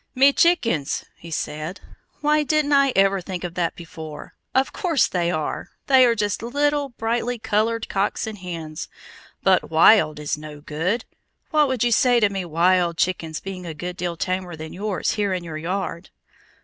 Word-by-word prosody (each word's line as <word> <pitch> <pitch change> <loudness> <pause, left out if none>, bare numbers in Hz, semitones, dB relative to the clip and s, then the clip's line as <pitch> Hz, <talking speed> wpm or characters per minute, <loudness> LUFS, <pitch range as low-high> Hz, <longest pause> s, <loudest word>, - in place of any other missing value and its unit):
"Me 275 +2 +6
chickens!" 230 - +2
he 170 - -12
said. 155 +3 -4 0.4
"Why 300 +1 +3
didn't 300 -1 +1
I 275 -1 +5
ever 195 0 +3
think 180 0 -6
of 175 -1 -4
that 175 -2 -1
before? 160 -3 -9 0.2
Of 265 0 +2
course 335 -8 +2
they 175 -2 0
are! 155 -3 -3 0.2
They 260 -2 +6
are 235 - +2
just 205 -1 -1
little, 285 +4 0
brightly 240 +1 -2
colored 225 +1 0
cocks 195 +4 -1
and 215 -2 -7
hens! 165 -4 -6 0.6
But 190 -2 +3
'wild' 160 -1 +5
is 150 0 -2
no 150 -1 -9
good. 165 +10 -2 0.5
What 300 -2 +4
would 260 -3 0
you 240 - +2
say 245 +1 +4
to 210 -3 +3
me 190 -2 -3
'wild 170 +1 +2
chickens' 165 -3 -1
being 185 -2 -7
a 160 - -6
good 180 +3 -5
deal 175 -2 -3
tamer 185 -1 -2
than 160 0 -8
yours 200 +1 -1
here 205 -3 0
in 180 -1 -3
your 160 -2 -6
yard?" 180 +1 -3
190 Hz, 175 wpm, -23 LUFS, 170-235 Hz, 0.6 s, Me